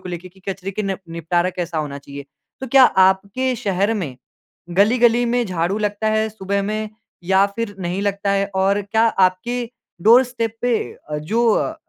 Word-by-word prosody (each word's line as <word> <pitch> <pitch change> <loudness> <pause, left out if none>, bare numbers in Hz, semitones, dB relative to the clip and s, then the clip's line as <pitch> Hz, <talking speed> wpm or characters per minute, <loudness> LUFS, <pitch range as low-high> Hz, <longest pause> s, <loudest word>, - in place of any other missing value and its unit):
को - - -9
लेके 175 +1 -6
कि 190 +1 -23
कचरे 195 0 -4
का 205 +2 -3
नेप 195 -1 -3
निपटारा 170 +2 -1
कैसा 175 -3 -4
होना 145 -2 -4
चाहिए। 140 0 -10 0.4
तो 265 - -4
क्या 265 +1 +6
आपके 195 +7 +2
शहर 200 +1 0
में 160 - -4 0.6
गली-गली 235 +3 +4
में 240 0 +1
झाड़ू 185 +2 -1
लगता 210 +1 -1
है 220 0 +1
सुबह 200 -1 -2
में 215 +1 -3 0.4
या 190 +2 +4
फ़िर 230 -3 -3
नहीं 180 +1 -3
लगता 200 0 -1
है? 200 0 +1
और 195 +2 +2
क्या 220 +3 +1
आपके 210 +5 +1 0.4
डोरस्टेप 230 0 +3
पे 245 -2 +2 0.3
अ, 150 - -2
जो 220 +11 0
अ, 320 - -1
200 Hz, 175 wpm, -20 LUFS, 185-225 Hz, 0.6 s, क्या